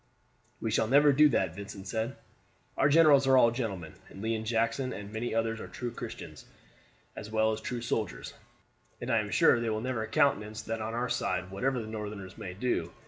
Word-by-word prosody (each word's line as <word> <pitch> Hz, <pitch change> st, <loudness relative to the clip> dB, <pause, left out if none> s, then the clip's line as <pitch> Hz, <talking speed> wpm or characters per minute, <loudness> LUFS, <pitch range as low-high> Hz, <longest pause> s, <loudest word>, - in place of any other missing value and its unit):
"We -, -, -2 dB
shall 110 Hz, -, +2 dB
never 145 Hz, +3 st, +5 dB
do 150 Hz, +2 st, +6 dB
that," 95 Hz, -9 st, +1 dB
Vincent 100 Hz, -1 st, -8 dB
said. 110 Hz, +5 st, -2 dB, 0.6 s
"Our 140 Hz, -, +3 dB
generals 145 Hz, -3 st, +6 dB
are 130 Hz, 0 st, +6 dB
all 115 Hz, -2 st, +6 dB
gentlemen, 100 Hz, -, -4 dB, 0.2 s
and -, -, -12 dB
Lee 110 Hz, +2 st, -1 dB
and 110 Hz, 0 st, -4 dB
Jackson 115 Hz, +3 st, 0 dB
and 100 Hz, +2 st, -8 dB
many 115 Hz, +1 st, -3 dB
others 115 Hz, 0 st, 0 dB
are -, -, -7 dB
true 120 Hz, -1 st, -5 dB
Christians -, -, -8 dB, 0.7 s
as 105 Hz, -, -7 dB
well 110 Hz, 0 st, +2 dB
as 110 Hz, -, -4 dB
true 120 Hz, -2 st, -4 dB
soldiers, 105 Hz, -, -3 dB, 0.7 s
and 120 Hz, -, -3 dB
I 115 Hz, -, +4 dB
am 105 Hz, -1 st, -3 dB
sure 120 Hz, -, +4 dB
they 115 Hz, -1 st, -1 dB
will 110 Hz, 0 st, -1 dB
never 115 Hz, -2 st, -2 dB
countenance 110 Hz, -3 st, +1 dB
that 115 Hz, 0 st, -4 dB
on 110 Hz, +1 st, -3 dB
our 120 Hz, +1 st, -1 dB
side 90 Hz, -6 st, -1 dB
whatever 125 Hz, +7 st, -1 dB
the 110 Hz, -, -5 dB
Northerners 105 Hz, -3 st, -6 dB
may 90 Hz, -1 st, -7 dB
do. 125 Hz, +5 st, -1 dB
110 Hz, 200 wpm, -30 LUFS, 105-125 Hz, 0.7 s, do